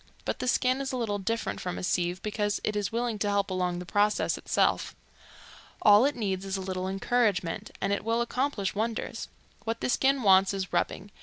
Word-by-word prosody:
But -, -, -2 dB
the -, -, -3 dB
skin 255 Hz, +1 st, +2 dB
is 270 Hz, -, -3 dB
a 255 Hz, -, -2 dB
little 210 Hz, -4 st, -1 dB
different 225 Hz, +4 st, -2 dB
from 180 Hz, -1 st, -4 dB
a -, -, -5 dB
sieve, 180 Hz, 0 st, 0 dB
because 210 Hz, -1 st, -1 dB
it 215 Hz, -, -1 dB
is 205 Hz, -2 st, -1 dB
willing 230 Hz, -2 st, -1 dB
to 205 Hz, -, 0 dB
help 200 Hz, -1 st, 0 dB
along 180 Hz, -1 st, -1 dB
the 180 Hz, -, -6 dB
process 205 Hz, +4 st, +1 dB
itself. -, -, 0 dB, 0.9 s
All 210 Hz, +3 st, +7 dB
it 285 Hz, -, +1 dB
needs 195 Hz, -5 st, -2 dB
is 195 Hz, 0 st, -3 dB
a -, -, -4 dB
little 185 Hz, 0 st, -3 dB
encouragement 195 Hz, -3 st, 0 dB
and 195 Hz, +1 st, 0 dB
it 200 Hz, -, -2 dB
will 230 Hz, +1 st, +1 dB
accomplish 235 Hz, -4 st, -1 dB
wonders. 225 Hz, +2 st, -3 dB, 0.4 s
What 225 Hz, 0 st, -2 dB
the -, -, -2 dB
skin 270 Hz, +1 st, +2 dB
wants 195 Hz, 0 st, +5 dB
is 190 Hz, -1 st, -4 dB
rubbing. 200 Hz, -, -1 dB
205 Hz, 205 wpm, -28 LUFS, 190-230 Hz, 0.9 s, All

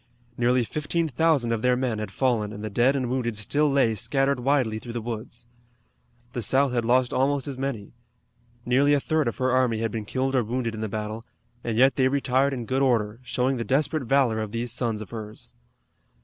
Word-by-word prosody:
Nearly 120 Hz, +1 st, +2 dB
fifteen 155 Hz, +6 st, -1 dB
thousand 140 Hz, -3 st, +2 dB
of 115 Hz, -2 st, -1 dB
their 125 Hz, +1 st, +3 dB
men 125 Hz, -4 st, -1 dB
had 105 Hz, -, -4 dB
fallen 115 Hz, -6 st, 0 dB
and 105 Hz, 0 st, -8 dB
the 110 Hz, -, -4 dB
dead 120 Hz, +6 st, +3 dB
and 130 Hz, -2 st, -1 dB
wounded 120 Hz, -3 st, -2 dB
still 145 Hz, +8 st, +1 dB
lay 135 Hz, -5 st, +3 dB
scattered 135 Hz, +5 st, 0 dB
widely 125 Hz, -4 st, +1 dB
through 120 Hz, +1 st, -8 dB
the 120 Hz, -, -2 dB
woods. 115 Hz, +1 st, -6 dB, 0.9 s
The 120 Hz, -, -3 dB
South 135 Hz, +5 st, +2 dB
had 120 Hz, -1 st, +1 dB
lost 125 Hz, +1 st, +2 dB
almost 135 Hz, +1 st, +1 dB
as 140 Hz, -, -4 dB
many. 130 Hz, -6 st, -4 dB, 0.7 s
Nearly 140 Hz, +4 st, +4 dB
a -, -, +2 dB
third 155 Hz, 0 st, 0 dB
of 115 Hz, -, -2 dB
her 130 Hz, 0 st, +1 dB
army 125 Hz, -3 st, +2 dB
had 115 Hz, 0 st, -1 dB
been 110 Hz, -1 st, -4 dB
killed 135 Hz, +4 st, -1 dB
or 125 Hz, -, +3 dB
wounded 115 Hz, +1 st, -2 dB
in 110 Hz, -, -6 dB
the 110 Hz, -, -2 dB
battle, 110 Hz, +2 st, -4 dB, 0.4 s
and 115 Hz, -2 st, -2 dB
yet 130 Hz, +2 st, +4 dB
they 130 Hz, -1 st, +4 dB
retired 135 Hz, 0 st, +1 dB
in 125 Hz, -4 st, -4 dB
good 130 Hz, +3 st, 0 dB
order, 115 Hz, -4 st, +1 dB
showing 125 Hz, +1 st, -1 dB
the 115 Hz, -, -2 dB
desperate 140 Hz, +2 st, 0 dB
valor 125 Hz, -3 st, +2 dB
of 110 Hz, -2 st, -5 dB
these 120 Hz, +1 st, -2 dB
sons 115 Hz, -4 st, -2 dB
of -, -, -16 dB
hers. 110 Hz, -2 st, -7 dB
125 Hz, 210 wpm, -25 LUFS, 115-135 Hz, 0.9 s, Nearly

